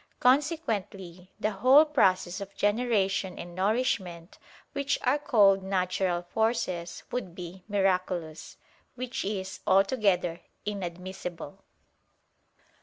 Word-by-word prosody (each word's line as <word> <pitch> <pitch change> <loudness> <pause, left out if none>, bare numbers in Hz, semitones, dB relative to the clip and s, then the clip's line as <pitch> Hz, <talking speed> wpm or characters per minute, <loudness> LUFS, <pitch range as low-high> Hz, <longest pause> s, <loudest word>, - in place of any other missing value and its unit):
Consequently 210 - 0
the 215 - 0
whole 255 +10 +6
process 190 - +2
of 200 0 -8
generation 205 -4 +1
and 175 0 -8
nourishment, 185 -4 -1 0.3
which 280 0 0
are 270 +3 +2
called 205 -9 +4
"natural 185 -2 0
forces," 185 -4 -2
would 190 -9 -4
be 180 +1 -9
miraculous. 185 -5 -1 0.4
Which 255 0 -4
is 190 -1 -4
altogether 195 -4 +2 0.2
inadmissible. 180 -4 -6
195 Hz, 95 wpm, -28 LUFS, 180-225 Hz, 0.4 s, whole